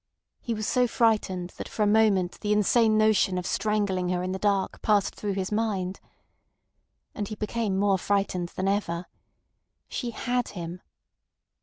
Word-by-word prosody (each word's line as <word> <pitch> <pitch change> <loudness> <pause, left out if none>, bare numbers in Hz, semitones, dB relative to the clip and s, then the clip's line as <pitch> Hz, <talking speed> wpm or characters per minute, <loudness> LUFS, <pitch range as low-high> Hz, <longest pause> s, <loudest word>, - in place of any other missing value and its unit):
He 235 - -3
was 215 -1 -3
so 250 -1 +3
frightened 205 -7 +1
that - - -6
for 215 - -1
a - - +3
moment 205 -4 +3
the 210 - -2
insane 215 +1 +3
notion 215 -4 +3
of 180 - -3
strangling 200 -4 0
her 180 0 0
in 185 - -2
the 190 - -3
dark 200 -2 0
passed 205 -2 +2
through 205 -1 -3
his 190 0 -3
mind. 200 -4 -1 1.1
And 205 - -4
he 215 - -5
became 210 -2 -2
more 195 -1 +2
frightened 195 -3 0
than 190 - -1
ever! 180 -4 -1 0.8
She 245 - -4
had 245 +1 -1
him! 175 +1 -6
205 Hz, 160 wpm, -27 LUFS, 185-215 Hz, 1.1 s, so